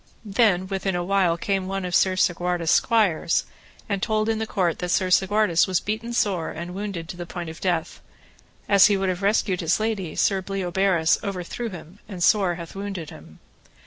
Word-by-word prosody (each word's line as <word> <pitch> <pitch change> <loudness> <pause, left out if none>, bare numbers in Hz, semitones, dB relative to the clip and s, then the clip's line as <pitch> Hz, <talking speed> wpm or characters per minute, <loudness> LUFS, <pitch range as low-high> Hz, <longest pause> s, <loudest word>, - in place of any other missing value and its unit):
Then 200 -3 +2
within 190 -1 -2
a 175 - -1
while 185 -2 +2
came 195 +1 -1
one 195 -1 -3
of 180 - -5
Sir 185 +1 +3
Segwarides' 175 -2 0
squires, 205 -8 +2 0.4
and 200 -2 -2
told 215 +1 0
in 220 -1 0
the 220 - -3
court 175 -6 0
that 180 - -3
Sir 185 +1 +1
Segwarides 190 -2 +3
was 185 -2 +1
beaten 220 +3 -4
sore 195 -8 0
and 170 +2 -7
wounded 195 -4 -5
to 175 - -7
the 175 -1 -6
point 170 -3 -6
of 160 - -13
death; 175 -4 -2 0.7
as 200 0 +7
he 205 -2 +2
would 190 -1 0
have 180 +1 -3
rescued 195 -2 +1
his 165 +3 +1
lady 215 -7 -2
Sir 195 -2 +1
Bleoberis 185 -2 +1
overthrew 200 +4 -4
him 180 0 -11
and 180 -4 -4
sore 190 -4 +3
hath 170 -1 -9
wounded 195 -5 -6
him. 80 +1 -14
190 Hz, 190 wpm, -24 LUFS, 175-200 Hz, 0.7 s, as